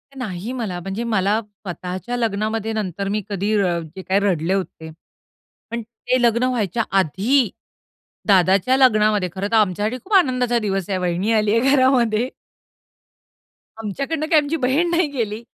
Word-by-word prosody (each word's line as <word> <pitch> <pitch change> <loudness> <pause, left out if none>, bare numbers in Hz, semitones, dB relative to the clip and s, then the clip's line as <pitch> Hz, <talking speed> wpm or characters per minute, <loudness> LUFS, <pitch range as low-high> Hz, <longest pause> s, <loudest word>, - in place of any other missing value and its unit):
नाही, 215 -3 -5
मला. 210 -8 -4
म्हणजे 195 +6 -4
मला 215 -2 +1
स्वतःच्या 200 +2 -6
लग्नामध्ये 220 0 -1
नंतर 200 -2 -3
मी 210 +1 -1
कधी 200 +2 -1
रड 175 -4 0
जे 190 - -6
काय 190 +1 +1
रडले 185 -3 0
होते, 180 -4 -4 0.8
पण 235 0 -3
ते 235 +3 -2
लग्न 235 0 +3
व्हायच्या 235 -4 0 0.2
आधी, 210 - +2 0.8
दादाच्या 195 +6 +4
लग्नामध्ये, 215 -6 +3
खरंतर 200 +4 -1
आमच्यासाठी 210 +3 +1
खूप 415 - -7
आनंदाचा 250 -8 +3
दिवस 195 -3 -2
आहे. 190 - 0
वहिनी 180 +4 -1
आली 215 0 +2
आहे 270 +3 +3
घरामध्ये. 250 -3 +2 1.5
आमच्याकडुन 275 - -3
काय 320 -3 +6
आमची 295 +2 -2
बहीण 280 +6 +1
नाही 340 -1 +2
गेली. 225 -3 -3
215 Hz, 140 wpm, -21 LUFS, 195-245 Hz, 1.5 s, काय